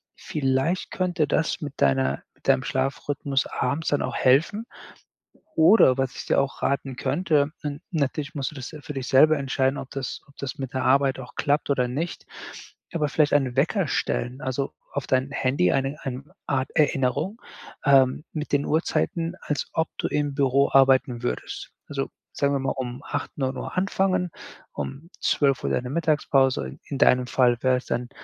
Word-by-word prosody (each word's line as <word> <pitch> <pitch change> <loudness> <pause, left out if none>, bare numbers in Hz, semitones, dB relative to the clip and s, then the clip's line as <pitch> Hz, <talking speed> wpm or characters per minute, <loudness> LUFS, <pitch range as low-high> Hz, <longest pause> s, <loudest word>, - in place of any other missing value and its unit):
Vielleicht 135 +5 -1
könnte 180 -4 0
das 160 +5 0
mit 145 -3 -5
deiner 65 0 +2
mit - - -17
deinem 130 - +4
Schlafrhythmus 135 +1 -1
abends 145 +6 -1
dann 145 - +1
auch - - -3
helfen. 160 - +3 0.9
Oder 160 - +6
was 135 -1 -1
ich - - -7
dir - - +3
auch 135 0 -3
raten 140 -1 0
könnte, 150 0 +1
na 145 -1 -4
natürlich 145 -2 -2
musst 135 -2 -2
du - - -14
das 130 -3 -6
se 155 -2 -10
für 150 - -6
dich 130 -2 -4
selber 155 +4 +6
entscheiden, 135 0 0
ob 130 - -7
das 135 -2 -5
ob 140 - -22
das 140 -2 -5
mit 135 0 -5
der 130 - -1
Arbeit 135 0 +3
auch 125 -2 -9
klappt 145 +1 0
oder 125 -3 +2
nicht. 155 +8 -4 0.7
Aber 155 -3 0
vielleicht 150 0 +2
einen 135 -4 +2
Wecker 175 +7 +2
stellen, 125 +1 -1
also, 135 +1 -2 0.2
auf 140 - -3
dein 130 +1 +1
Handy 130 -10 +1
eine 135 +2 0
ein 135 +2 -6 0.2
Art 130 -2 0
Erinnerung, 145 - +1 0.4
ähm, 135 0 +4
mit 155 -1 -5
den 145 0 +2
Uhrzeiten, 165 +1 0
als 145 -2 -2
ob 160 0 +1
du - - -1
im 145 -1 -1
Büro 140 0 +3
arbeiten 130 -2 +4
würdest. 120 - -4 0.2
Also, - - -3 0.2
sagen 140 0 +1
wir - - +1
mal 135 - -1
um 125 0 -5
8, 145 - -3
9:00 130 -1 -3
anfangen, 185 -1 +1 0.4
um 135 - -6
12:00 140 -3 +1
deine 125 0 -1
Mittagspause, 145 -4 +1
in 140 - -5
deinem 125 -1 +4
Fall 125 -1 +3
wäre 130 -1 +4
es 125 - -9
dann 120 0 -2
140 Hz, 175 wpm, -25 LUFS, 130-150 Hz, 0.9 s, Oder